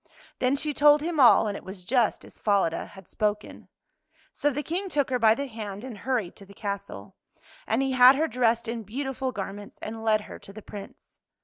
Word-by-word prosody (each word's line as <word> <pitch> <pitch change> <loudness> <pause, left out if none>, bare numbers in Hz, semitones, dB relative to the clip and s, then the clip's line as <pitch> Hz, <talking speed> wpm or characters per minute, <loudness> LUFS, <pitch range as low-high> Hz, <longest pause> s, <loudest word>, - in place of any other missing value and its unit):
Then 255 +2 +2
she 295 +1 -2
told 295 +1 +5
him 325 0 -2
all, 245 -3 +7
and 205 - -3
it - - -8
was 190 -1 -9
just 240 +1 +1
as - - -17
Falada 200 -6 +1
had 190 -2 -14
spoken. 210 0 -3 0.7
So 290 - +1
the 290 +1 -3
King 370 +5 -3
took 285 -5 0
her 250 - +1
by 220 -1 +5
the 280 - -3
hand 215 -4 -7
and 255 -3 -7
hurried 225 -2 -2
to 200 - -13
the 200 - -15
castle. 200 -1 -6 0.5
And 270 - +1
he 270 - 0
had 255 +1 +7
her 315 +4 +1
dressed 235 -2 +1
in 230 0 -3
beautiful 260 +4 -4
garments 200 -1 -7
and 225 +1 -7
led 215 -1 +3
her - - -10
to - - -13
the 210 +1 -11
Prince. 205 -2 -11
230 Hz, 210 wpm, -26 LUFS, 205-270 Hz, 0.7 s, all